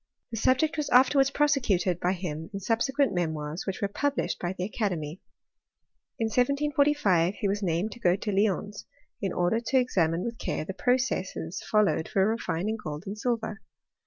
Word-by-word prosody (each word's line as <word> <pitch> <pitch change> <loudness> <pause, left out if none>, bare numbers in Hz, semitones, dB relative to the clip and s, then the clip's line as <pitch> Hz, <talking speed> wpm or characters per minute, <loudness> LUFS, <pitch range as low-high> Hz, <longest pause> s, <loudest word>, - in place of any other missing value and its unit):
The 225 - -4
subject 260 +8 +2
was 300 - -1
afterwards 270 +2 +5
prosecuted 245 - +1
by 180 +2 +1
him 165 -3 -5
in - - -2
subsequent 235 +4 +1
memoirs 160 -1 -3
which 195 +1 -3
were - - +3
published 280 +7 -1
1^ 175 +1 -3
the 180 - -2
academy. 185 -6 -3 1.0
In 225 - 0
1745 275 - +2
he 205 - -1
was 205 +1 -1
named 180 +3 0
to 240 - -10
go 180 -5 +3
to 205 +2 -3
Lyons 205 0 0 0.3
in 195 - -1
order 180 +6 +1
to 245 +3 0
examine 175 -9 +1
with 235 -1 -5
care - - -2
the 195 - -5
processes 210 -7 -1
followed 210 -6 +2
for 195 0 +2
refining 220 -1 -1
gold 150 +1 -5
and 200 - -5
silver. 220 -1 -2
205 Hz, 165 wpm, -28 LUFS, 180-250 Hz, 1.0 s, afterwards